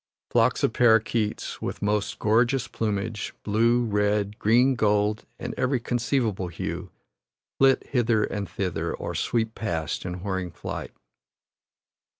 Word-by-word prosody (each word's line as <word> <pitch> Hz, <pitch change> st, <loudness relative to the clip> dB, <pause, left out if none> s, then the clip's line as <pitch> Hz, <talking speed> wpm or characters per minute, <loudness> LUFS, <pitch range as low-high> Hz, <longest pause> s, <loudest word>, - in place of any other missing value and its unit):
Flocks -, -, +3 dB
of -, -, +2 dB
paroquets 110 Hz, -2 st, +2 dB
with -, -, -4 dB
most 105 Hz, 0 st, 0 dB
gorgeous 120 Hz, +4 st, +2 dB
plumage 110 Hz, -1 st, -3 dB
blue, 115 Hz, +3 st, +3 dB
red, 105 Hz, -1 st, 0 dB
green, 125 Hz, +5 st, +4 dB
gold, 105 Hz, -2 st, +1 dB
and 120 Hz, -, -5 dB
every 130 Hz, 0 st, +1 dB
conceivable 115 Hz, -5 st, 0 dB
hue 85 Hz, -1 st, -5 dB, 0.7 s
flit 135 Hz, -1 st, +4 dB
hither 115 Hz, -4 st, +2 dB
and 100 Hz, -2 st, -3 dB
thither, 85 Hz, -3 st, -2 dB
or -, -, -5 dB
sweep 110 Hz, -2 st, 0 dB
past 80 Hz, -9 st, -3 dB
in 90 Hz, 0 st, -5 dB
whirring 95 Hz, -3 st, -2 dB
flight. -, -, -6 dB
110 Hz, 125 wpm, -26 LUFS, 100-120 Hz, 0.7 s, green